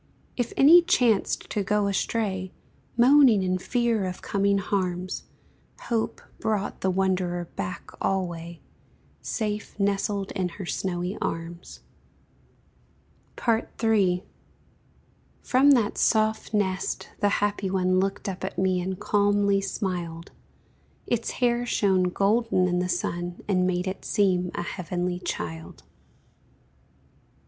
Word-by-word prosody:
If 245 -2 -2
any 320 +6 +8
chanced 240 - +2
to 210 - 0
go 210 +1 +1
astray, 195 -2 -1 0.5
Moaning 250 -4 +6
in 185 0 0
fear 235 -1 0
of 180 -1 -6
coming 200 0 +1
harms, 185 -2 -2 0.6
Hope 230 -2 -2 0.2
brought 210 -2 -2
the 190 - +1
wanderer 185 -2 0
back 185 +2 -5
alway, 170 -3 -2 0.6
Safe 210 -1 -4
nestled 200 0 0
in 185 -3 -1
her 195 - -5
snowy 180 +2 -3
arms. 165 +1 -5 1.7
III. 220 -5 +2 1.2
From 265 +3 +4
that 235 -7 +3
soft 220 -1 +2
nest 195 -3 -1
the 205 - +3
happy 205 -1 0
one 185 -1 +2
Looked 195 +2 -2
up 190 -1 -5
at 190 - -4
me 185 -1 +1
and 185 +1 -4
calmly 205 -1 +2
smiled; 175 -4 -4 0.7
Its 235 -1 -1
hair 240 -1 +1
shone 195 -6 +2
golden 200 0 +2
in 180 0 0
the 180 0 -1
sun, 175 0 -3
And 185 -3 +2
made 180 0 0
it 190 0 -4
seem 185 -4 +1
a - - -2
heavenly 180 0 -3
child. 80 - -6
195 Hz, 115 wpm, -26 LUFS, 180-210 Hz, 1.7 s, any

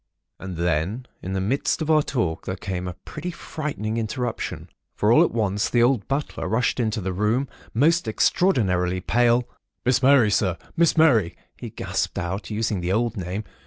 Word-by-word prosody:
And 95 -2 -6
then 90 +8 -1 0.2
in 95 - -4
the 95 - 0
midst 115 +9 0
of 160 -1 0
our 155 -1 +5
talk 115 - -2
there 95 - -2
came 90 -2 -4
a 90 - -5
pretty 160 +3 -5
frightening 145 - -4
interruption; 115 +1 -3 0.3
for - - +2
all - - +7
at - - +2
once 105 -2 0
the 120 -1 +3
old 120 -3 +2
butler 140 -7 -2
rushed 110 +6 0
into 110 -1 0
the 95 0 -3
room, 110 +8 +1 0.3
most 160 +3 +3
extraordinarily 95 - +2
pale:— 120 +4 +2 0.4
"'Miss 125 -1 +3
Mary, 130 -5 +5
Sir! 95 -4 +1 0.2
Miss 170 0 +3
Mary, 120 - +4
Sir!' - - -31
he - - -7
gasped - - -3
out, 90 +2 -3
using 105 -3 -1
the 90 +1 -1
old 115 +3 0
name. 95 +2 -4
110 Hz, 180 wpm, -24 LUFS, 95-130 Hz, 0.4 s, all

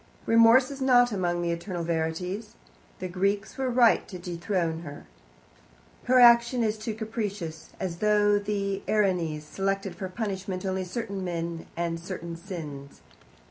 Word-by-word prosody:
Remorse 230 +4 +6
is 275 -1 -8
not 245 -2 +5
among 175 -3 -1
the 170 - 0
eternal 170 +1 -4
verities. 170 +5 -3 0.4
The 185 - -4
Greeks 195 +3 -1
were 265 -1 -1
right 240 -2 +4
to 185 - -7
dethrone 170 -1 -2
her. 145 -3 -9 1.0
Her 255 0 +5
action 235 0 +6
is 215 -1 -1
too 215 0 -4
capricious, 205 -8 -5
as 175 -3 -3
though 205 0 +3
the 200 -1 -2
Erinyes 180 -7 +1
selected 195 +3 -2
for 190 +1 -5
punishment 190 -2 -4
only 190 0 -1
certain 200 0 -4
men 170 -2 -4
and 170 -1 -1
certain 170 -1 -6
sins. 155 -6 -8
190 Hz, 140 wpm, -27 LUFS, 170-215 Hz, 1.0 s, Remorse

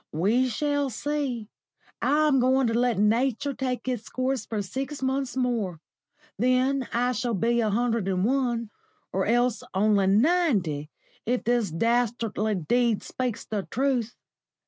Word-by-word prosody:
We 220 +11 +2
shall 285 +3 0
see. 260 -3 -3 0.5
I'm 295 -2 +3
going 260 +1 +3
to 230 - 0
let 240 -1 +2
Nature 245 +6 +1
take 255 -1 -3
its 245 -3 -3
course 255 -3 -2
for 215 -2 -2
six 270 +7 -5
months 265 -1 -1
more; 230 -10 -1 0.6
then 255 +2 +2
I 245 +1 +1
shall 240 -1 -1
be 235 +5 +1
a 220 - +1
hundred 230 -1 0
and 185 0 +1
one, 240 -3 0 0.4
or 190 0 0
else 240 0 +2
only 200 -1 +3
ninety, 205 - +2 0.4
if 250 +1 0
this 235 -4 +1
dastardly 225 +2 0
Deed 230 +6 +1
speaks 250 -3 -3
the 205 -3 -4
truth. 250 -3 0
240 Hz, 140 wpm, -26 LUFS, 215-260 Hz, 0.6 s, I'm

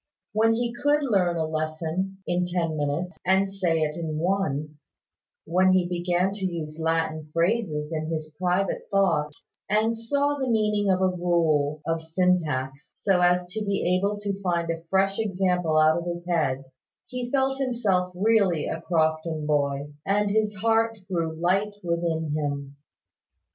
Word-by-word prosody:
When 225 +1 +3
he 235 0 -1
could 290 +4 +1
learn 185 -9 +2
a 160 - 0
lesson 160 +5 -3
in 180 0 0
ten 170 -3 -1
minutes, 150 +5 -2
and 190 +2 +3
say 180 -4 0
it 150 -1 0
in 160 -2 -3
one; 155 -4 -1 0.7
when 185 +2 +3
he 185 -1 +3
began 175 +1 0
to 200 -1 -7
use 165 -4 -4
Latin 160 -1 -1
phrases 165 -3 0
in 155 -1 -2
his 155 -1 -4
private 185 +2 0
thoughts, 165 -7 +1 0.3
and 220 +3 +2
saw 285 +5 0
the 265 -2 -1
meaning 210 -3 +2
of 185 0 +2
a - - +5
rule 165 -5 +1
of 165 0 -1
syntax, 160 -5 -1
so 190 -3 +2
as 180 0 +3
to 220 - -2
be 195 -3 +1
able 200 +3 0
to 200 -1 -3
find 170 -3 0
a 165 0 -4
fresh 195 +3 +1
example 180 -6 +1
out 155 +1 +5
of 170 - -7
his 175 0 -5
own 175 - +1
head, 135 -4 0 0.4
he 250 -1 -5
felt 270 0 +1
himself 210 -9 0
really 195 -5 +2
a 160 - -3
Crofton 160 -2 0
boy, 145 -1 0
and 205 +1 +1
his 215 0 +1
heart 225 +2 +1
grew 165 -4 -2
light 195 +5 0
within 170 -2 -1
him. 140 -2 -3
180 Hz, 160 wpm, -25 LUFS, 160-200 Hz, 0.7 s, a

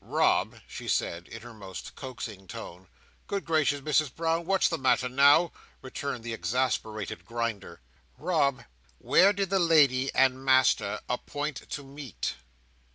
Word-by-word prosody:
"Rob," - - +1
she - - -8
said, 85 +1 -1
in 115 0 -10
her 120 -1 -10
most 95 -4 -9
coaxing 115 -7 -8
tone. 90 +1 -9 0.4
"Good 200 -1 -3
gracious, 145 -3 +1
Misses 150 0 +2
Brown, 165 +3 -1
what's 195 0 +3
the - - -2
matter 130 -1 +2
now?" 140 +6 +5 0.3
returned 130 -1 -5
the 115 -1 -4
exasperated 110 0 -2
Grinder. 115 - -4 0.4
"Rob! 150 -6 +1 0.3
where 195 - +5
did 195 -2 -2
the 195 - +3
lady 145 -6 +4
and 130 0 +3
Master 130 -1 +3
appoint 145 +1 -4
to 145 - -5
meet?" 140 -1 -5
130 Hz, 140 wpm, -28 LUFS, 115-155 Hz, 0.4 s, now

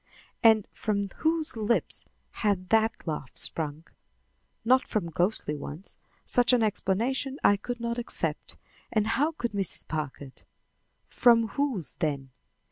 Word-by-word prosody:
And 220 -3 +5
from 200 -2 -1
whose 320 -3 0
lips 225 +1 0 0.2
had 195 -4 -1
that 225 0 +2
laugh 150 -5 -5
sprung? 155 0 -1 0.8
Not 255 +2 +4
from 170 -6 -2
ghostly 175 -3 0
ones. 150 +5 -8 0.3
Such 245 0 +3
an 240 -2 +4
explanation 235 +7 0
I 205 - +6
could 240 +4 -5
not 235 +1 -2
accept, 240 - -3 0.3
and 215 -1 +2
how 290 +8 +1
could 240 -7 -3
Mrs. 195 -3 -1
Packard? 145 -3 -5 0.7
From 230 -2 +4
whose, 260 - -1
then? 140 -4 -2
215 Hz, 125 wpm, -28 LUFS, 170-240 Hz, 0.8 s, I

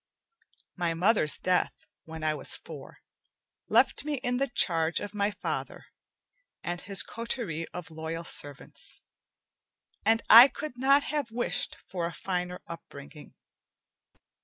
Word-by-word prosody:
My 170 -2 -1
mother's 180 - +3
death, 185 -1 0 0.2
when 160 -1 -8
I 155 -1 +2
was - - -4
four, - - -11 0.7
left - - +3
me 300 0 -1
in 245 -2 -1
the 275 +2 +1
charge 165 -8 +1
of 205 - -6
my 205 0 +1
father 205 - -5 0.8
and 175 0 -3
his 195 0 +1
coterie 225 - -4
of 180 -2 -9
loyal 160 +1 -5
servants, 145 -4 -4 1.0
and 225 0 +3
I 235 +4 +11
could 295 -1 -7
not 275 +3 +4
have 290 -5 -2
wished 240 +2 -2
for 175 -3 -3
a 170 - -7
finer 180 +1 -3
upbringing. 150 -2 -11
180 Hz, 130 wpm, -29 LUFS, 165-235 Hz, 1.0 s, I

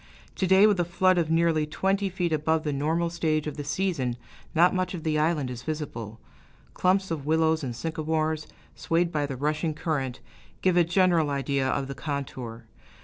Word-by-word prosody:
To 190 - +1
day, 190 +2 +6
with 205 -3 +3
a - - +4
flood 180 +1 +2
of 160 -2 0
nearly 165 -2 +2
twenty 195 +5 0
feet 175 -3 -1
above 155 +1 +1
the 150 -2 -1
normal 160 +4 0
stage 155 -3 0
of 150 - -4
the 145 - -5
season, 145 -6 -1 0.4
not 175 +3 +5
much 185 0 -1
of 165 - -7
the 155 -1 +1
island 150 -4 +1
is 125 -1 -6
visible, 125 -7 -5 0.5
clumps 190 0 +1
of 150 -3 -4
willows 160 0 +2
and 125 -3 -4
sycamores, 155 +1 -2 0.3
swayed 170 0 0
by 150 -3 0
the 135 -2 -5
rushing 150 +3 -1
current, 135 -6 -2 0.4
giving 180 -1 +4
a - - -6
general 175 -4 +3
idea 140 -1 0
of 135 0 -1
the 140 - -5
contour. 130 -6 -5
155 Hz, 185 wpm, -27 LUFS, 145-175 Hz, 0.5 s, day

